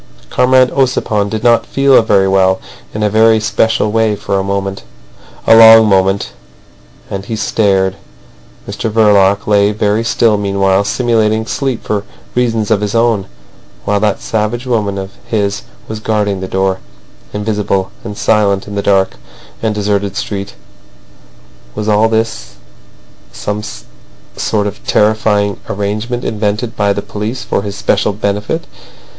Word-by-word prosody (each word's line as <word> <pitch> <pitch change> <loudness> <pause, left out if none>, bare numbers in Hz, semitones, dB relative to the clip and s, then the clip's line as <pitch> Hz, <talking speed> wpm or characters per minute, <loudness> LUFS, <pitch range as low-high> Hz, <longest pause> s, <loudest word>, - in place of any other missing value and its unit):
Comrade 130 0 +3
Ossipon 115 -6 0
did 110 +1 -4
not 120 -2 +4
feel 135 -2 +3
very 100 -3 +2
well 95 -1 +2 0.3
in 105 - -3
a - - +3
very 110 +1 +4
special 110 -1 +1
way 110 -1 +1
for 100 -1 -2
a - - -1
moment—a 95 - -3
long 115 0 +9
moment. 95 -1 +1 0.8
And 100 0 -4
he 115 - -4
stared. 95 -3 +1 0.7
Mr 115 - -3
Verloc 100 -2 +3
lay 100 -1 +3
very 105 +1 0
still 115 -2 +2
meanwhile, 100 -1 +1
simulating 110 -1 +1
sleep 130 +1 -3
for 105 -1 -2 0.3
reasons 115 -3 0
of 105 -2 +2
his 105 +1 -2
own, 115 -4 +1 0.6
while 105 0 +1
that 105 -1 0
savage 110 +3 -2
woman 105 -5 -1
of 95 0 -5 0.2
his 100 -2 -1 0.3
was 110 0 -5
guarding 105 -3 -1
the 95 - -4
door—invisible 95 - -3
and 105 -3 -7
silent 100 -3 +1
in 100 - -7
the 100 - -1
dark 95 -5 +1 0.4
and 110 -2 -1
deserted 100 -1 -1
street. 100 -1 -5 1.2
Was 105 - -4
all 110 +1 +3
this 110 - -2 0.8
a - - -20
some 105 +1 -3 0.7
sort 105 -1 -1
of 105 0 -6
terrifying 105 -1 +1
arrangement 105 +5 -3
invented 110 +2 -2
by 100 -1 +1
the 100 0 -2
police 105 +4 -5
for - - -1
his 100 0 -6
especial 105 0 0
benefit? 105 +10 -2
105 Hz, 140 wpm, -14 LUFS, 100-110 Hz, 1.2 s, long